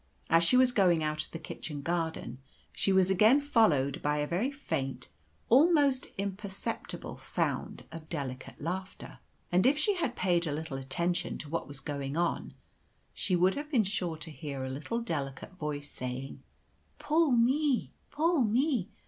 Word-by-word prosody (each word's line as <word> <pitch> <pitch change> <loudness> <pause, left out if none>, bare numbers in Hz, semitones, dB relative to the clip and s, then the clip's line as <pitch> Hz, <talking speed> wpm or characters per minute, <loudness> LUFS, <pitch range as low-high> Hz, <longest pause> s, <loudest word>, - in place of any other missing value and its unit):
As 165 +1 +6
she 250 +9 +5
was 255 -1 +5
going 180 -8 +3
out 155 0 -1
of - - -14
the - - -6
kitchen 150 -2 -7
garden, 160 -7 -2 0.3
she 195 - +1
was 190 0 +4
again 215 +9 +6
followed 195 - +2
by 150 0 +1
a 150 - 0
very 180 - 0
faint, 135 - -4 0.4
almost 285 0 +4
imperceptible, 200 0 -4
sound - - -2
of 160 -1 -9
delicate 135 -5 -5
laughter; 185 +4 -5 0.3
and 180 +6 +4
if 280 +2 +4
she 405 +7 +3
had 260 -8 -1
paid 175 -2 +1
a - - -1
little 150 -1 -4
attention 170 +7 -1
to 150 - -8
what 165 +2 -2
was 145 -1 -5
going 140 0 -4
on, 175 0 -1 0.6
she 185 - 0
would 180 +2 +4
have 295 +1 -5
been 250 -8 +3
sure 185 -5 -2
to 160 +1 -6
hear 145 -4 -5
a 130 - -4
little 155 - -3
delicate 145 - -4
voice 145 -1 -4
saying, 130 +2 -6 0.6
"Pull 315 +1 +2
me, 260 +3 +2 0.2
pull 320 0 +2
me! 235 - +1
175 Hz, 165 wpm, -30 LUFS, 150-235 Hz, 0.6 s, As